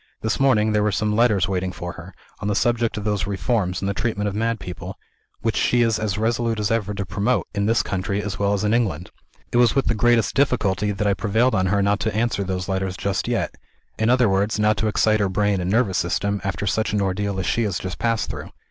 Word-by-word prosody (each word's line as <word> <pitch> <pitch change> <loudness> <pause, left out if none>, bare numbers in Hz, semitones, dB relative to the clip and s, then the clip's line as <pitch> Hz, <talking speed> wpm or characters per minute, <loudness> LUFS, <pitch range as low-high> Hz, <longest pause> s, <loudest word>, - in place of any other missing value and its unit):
This 110 - -1
morning 110 -6 +3
there 105 0 +2
were 105 0 +2
some 105 +2 0
letters 110 -5 +3
waiting 95 -1 -1
for 90 0 -6
her, 85 +3 -11 0.2
on 105 - -4
the 105 - 0
subject 120 0 +1
of 105 - -4
those 105 -3 -1
reforms 95 -1 -1
in - - 0
the 100 - 0
treatment 105 0 -1
of 100 - -2
mad 115 +2 -1
people, 90 -2 -7 0.4
which 115 -2 0
she 120 -1 +3
is 115 -2 +1
as 105 -3 -2
resolute 115 0 0
as 105 0 0
ever 105 -3 -1
to 100 0 -3
promote 105 +6 0
in 100 0 0
this 115 +1 +2
country 100 +1 -2
as 105 -2 -4
well 100 0 +2
as 100 - -1
in 105 +1 +2
England. 95 -8 -1 0.4
It - - +1
was 120 -1 +4
with 135 - +2
the - - +2
greatest 115 +1 +2
difficulty 105 -7 +1
that 105 +1 -2
I 100 - +3
prevailed 110 +6 +1
on 95 -2 +2
her 100 +1 +2
not 100 +1 +2
to 110 - -2
answer 115 -2 0
those 95 -1 -3
letters 95 -1 -2
just 100 -1 -2
yet: - - -1 0.5
in 110 +1 +2
other 125 -1 +4
words, 100 +2 +1
not 105 0 +3
to 110 - 0
excite 110 0 +2
her 100 -2 +1
brain 100 0 +1
and 90 - -2
nervous 105 -4 +2
system, 100 +4 -1
after 100 +1 -3
such 110 +3 0
an 105 - +1
ordeal 100 +1 -1
as 95 - -2
she 120 - +1
has 100 -4 -1
just 95 -1 -6
passed 115 -2 0
through. - - -7
105 Hz, 245 wpm, -22 LUFS, 95-115 Hz, 0.5 s, was